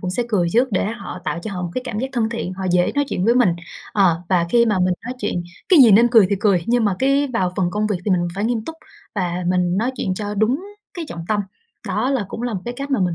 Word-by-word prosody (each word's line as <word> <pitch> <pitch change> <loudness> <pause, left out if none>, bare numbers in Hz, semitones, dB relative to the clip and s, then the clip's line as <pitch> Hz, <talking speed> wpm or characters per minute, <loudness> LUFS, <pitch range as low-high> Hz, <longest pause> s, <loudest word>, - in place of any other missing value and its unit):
cũng 180 -3 -3
sẽ 240 +6 0
cười 180 -6 +1
trước 250 +3 +3
để 190 - +1
họ 225 -4 -6
tạo - - -2
cho 215 - -5
họ 180 -1 -4
một 175 - -3
cái 255 - -2
cảm 215 -3 -4
giác 260 - -1
thân 230 -3 0
thiện, 230 -5 -4
họ 190 0 -6
dễ 175 0 +2
nói 285 0 +2
chuyện 180 - -2
với 235 +2 +4
mình. 245 -6 +4 0.4
Ờ, 175 -4 +2
và 175 -3 +2
khi 235 +2 +4
mà 210 -4 +1
mình 180 0 +2
nói 250 +1 -4
chuyện 175 - -2 0.3
cái 360 -5 +6
gì 230 - +7
nên 230 +4 +6
cười 225 -5 +6
thì 200 - +2
cười, 195 -5 +3
nhưng 240 -1 +2
mà 200 - +2
cái 275 +1 +2
vào 185 -6 0
phần 180 -3 +1
công 210 +2 -1
việc 205 -3 0
thì 205 - 0
mình 175 -1 +1
phải 200 - -2
nghiêm 225 -1 -1
túc 325 - -6 0.4
và 180 -2 -2
mình 180 0 +1
nói 240 +4 +1
chuyện 185 -3 -1
cho 205 +1 -4
đúng 245 - +1 0.3
cái 345 -3 -4
trọng 170 -1 -7
tâm. 210 -1 +1 0.5
Đó 260 - 0
là 255 -7 0
cũng 230 - -6
là 240 -3 -2
một 185 - -3
cái 240 0 -4
cách 280 +2 -5
mà 265 - +1
mình 180 -2 +1
210 Hz, 290 wpm, -20 LUFS, 180-240 Hz, 0.5 s, gì